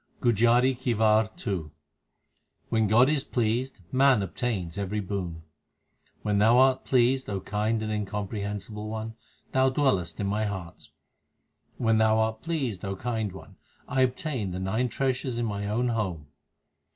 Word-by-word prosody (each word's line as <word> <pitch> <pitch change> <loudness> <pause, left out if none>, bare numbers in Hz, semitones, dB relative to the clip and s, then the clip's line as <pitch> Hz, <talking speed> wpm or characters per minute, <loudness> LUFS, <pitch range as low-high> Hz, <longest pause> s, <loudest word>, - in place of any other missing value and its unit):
1 120 - +5
GUJARI 120 +4 +4
KI 125 -2 0
WAR 110 0 +3 0.2
II 90 -7 -2 1.0
When 110 -1 +2
God 120 +5 +5
is 145 -2 +1
pleased, 120 0 -1
man 130 -5 +4
obtains 95 -4 -3
every 100 +2 -2
boon: 90 -5 -4 0.8
When 105 -1 +1
Thou 115 +4 +5
art 130 0 +4
pleased, 130 +1 +2
O 100 -1 -2
Kind 105 +3 -1
and 110 - -2
Incomprehensible 105 0 -4
One, 110 +1 -4 0.4
Thou 130 0 +3
dwellest 130 - 0
in 100 - -1
my 105 +2 0
heart. 95 -4 -6 0.9
When 115 -2 +2
Thou 110 0 +4
art 110 0 0
pleased, 135 - -2
O 95 0 -3
Kind 110 -1 -2
One, 95 - -12 0.3
I 135 -2 +1
obtain 130 -4 -1
the 90 0 -4
nine 110 +7 0
treasures 130 -1 -1
in 120 - 0
my 100 -2 -3
own 120 +4 0
home. 95 -10 -2
110 Hz, 150 wpm, -27 LUFS, 100-125 Hz, 1.0 s, 1